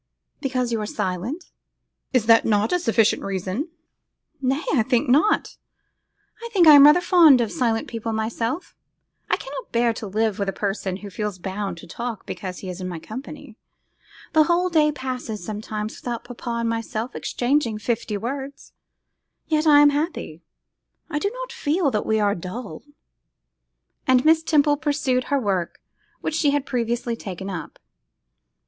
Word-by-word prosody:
'Because 255 -3 -1
you 225 -2 -1
are 210 - -3
silent?' 210 - -4 0.6
'Is 245 -4 +1
not 225 0 +6
that 215 0 +1
a 360 - +2
sufficient 225 -7 +2
reason?' 195 - -3 0.7
'Nay! 270 +4 0
I 260 - +4
think 245 +4 +1
not; 295 +12 +2 0.9
I 470 - -5
think 375 -6 +4
I 310 - +10
am 285 -1 +10
rather 300 +4 +7
fond 335 -7 +6
of 230 -3 0
silent 230 -3 0
people 230 -1 -4
myself; 230 +7 -3 0.5
I - - +2
cannot - - -8
bear 235 0 +2
to 220 - -6
live 215 +1 0
with 200 -1 0
a - - -3
person 195 -2 -2
who 200 - -8
feels 210 -1 -3
bound 190 0 -4
to 170 - -11
talk 235 +4 -5
because 185 -2 -6
he 190 - -7
is 180 +1 -8
my 180 -2 -4
companion. 220 - -9 0.8
The 310 -1 +5
whole 350 +2 +2
day 305 -3 +3
passes 255 -8 -5
sometimes 215 0 -5
without 240 -2 -4
papa 245 0 -8
and 230 - -1
myself 230 +1 -3
exchanging 245 -3 0
fifty 220 -1 -2
words; 270 +5 -6 0.7
yet 310 0 +1
I 290 -1 +8
am 290 0 +6
very 290 +1 +1
happy; 165 - -9 0.7
I 295 - 0
do 400 - 0
not - - -7
feel 330 - 0
that 210 - -1
we 220 0 +2
are 205 -1 +2
dull:' 185 0 -7 1.3
and 255 0 +4
Miss 320 0 +5
Temple 295 -2 +3
pursued 280 -4 0
her 280 -1 +1
work 190 -7 -2 0.4
which - - -2
she 305 -2 +2
had 285 -1 0
previously 240 -1 -1
taken 195 -2 -6
up. 175 -3 -7
235 Hz, 165 wpm, -23 LUFS, 210-290 Hz, 1.3 s, I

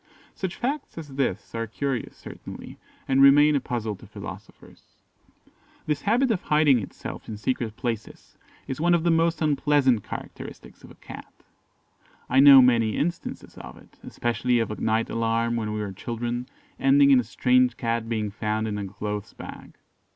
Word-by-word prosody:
Such 190 -1 -4
facts 275 - -4
as 155 -3 -7
this 135 -7 -3
are 115 0 -3
curious, 130 +2 -4
certainly, - - -10 0.3
and 135 0 +3
remain 145 +2 +7
a - - +3
puzzle 115 -4 -3
to - - -15
philosophers. - - -12 0.9
This 150 -2 -1
habit 240 +4 +2
of 200 - -1
hiding 150 -4 +3
itself 105 - -8
in 110 - -5
secret 110 0 -2
places 115 -2 -6 0.3
is 130 +3 -4
one 175 +1 +4
of 165 - 0
the 170 - +3
most 165 0 +1
unpleasant 145 -6 +2
characteristics - - -9
of - - -14
the - - -15
Cat. - - -11 1.0
I 130 - +4
know 135 -1 +9
many 115 -3 +2
instances 170 +2 -4
of - - -10
it - - -20
especially 120 +1 -1
of 115 -2 -1
a 105 - -6
night 110 +1 +1
alarm 115 +1 0
when 110 -2 -2
we 105 - -3
were 100 -2 -5
children, 120 +4 -4 0.3
ending 140 +1 +5
in 135 - +7
a - - 0
strange 125 +1 +2
cat 115 -1 -2
being 110 -3 -2
found 110 +1 -2
in 105 -1 -3
a 100 - -4
clothes 105 +1 -5
bag. - - -11
125 Hz, 170 wpm, -25 LUFS, 110-145 Hz, 1.0 s, know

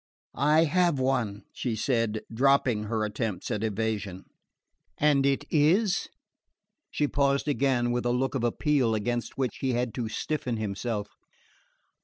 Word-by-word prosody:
"I 150 +5 +4
have 175 -1 +2
one," 125 -6 0
she 120 -3 -2
said, 115 -2 0
dropping 125 -3 +2
her 110 0 -1
attempts 105 -2 -3
at 105 - -2
evasion. 105 -3 -2 0.7
"And 140 -2 +3
it 140 +1 0
is 180 +7 +3 0.4
?" 310 - -58
She 150 - 0
paused 140 0 +1
again, 130 -4 +1
with 120 0 -1
a - - +2
look 130 +2 0
of 130 -4 -2
appeal 125 -1 +1
against 120 +3 -2
which 130 -5 -1
he 130 -2 -1
had 120 -1 -1
to 115 -3 -3
stiffen 125 -1 -2
himself. 105 0 -3
125 Hz, 145 wpm, -27 LUFS, 110-140 Hz, 0.7 s, I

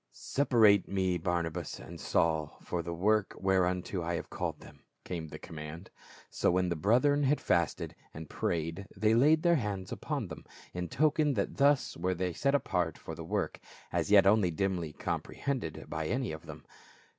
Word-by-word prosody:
"Separate 110 -8 +3
me 95 -2 0
Barnabas 85 -1 -2
and 85 0 -10
Saul 80 -3 0
for 90 - -2
the 85 +1 -5
work 105 +4 +1
whereunto 90 -1 +1
I 85 +1 -2
have - - -6
called - - -3
them," 70 - -14 0.2
came 85 -3 -5
the - - -8
command. 80 +3 -9 0.4
So - - +1
when 90 0 +2
the 85 - 0
brethren 125 - +3
had 145 +1 +2
fasted 85 -2 0 0.2
and 80 0 -8
prayed 85 +6 -2
they 110 +2 +3
laid 150 +7 +5
their 170 -1 +5
hands 100 -6 -3
upon - - -3
them, - - -9 0.3
in 90 0 -3
token 150 -1 +2
that 100 - -2
thus 140 0 +3
were 95 0 -1
they 90 0 -2
set 140 - +1
apart 90 - 0
for - - -8
the 85 +1 -7
work, 80 - -2 0.3
as - - -1
yet 100 -2 +7
only 100 -2 +4
dimly 90 -2 -1
com - - -2
prehended 125 - -4
by 80 0 -3
any 125 +5 -1
of 80 +1 -8
them. 80 -1 -10
90 Hz, 180 wpm, -31 LUFS, 85-110 Hz, 0.4 s, yet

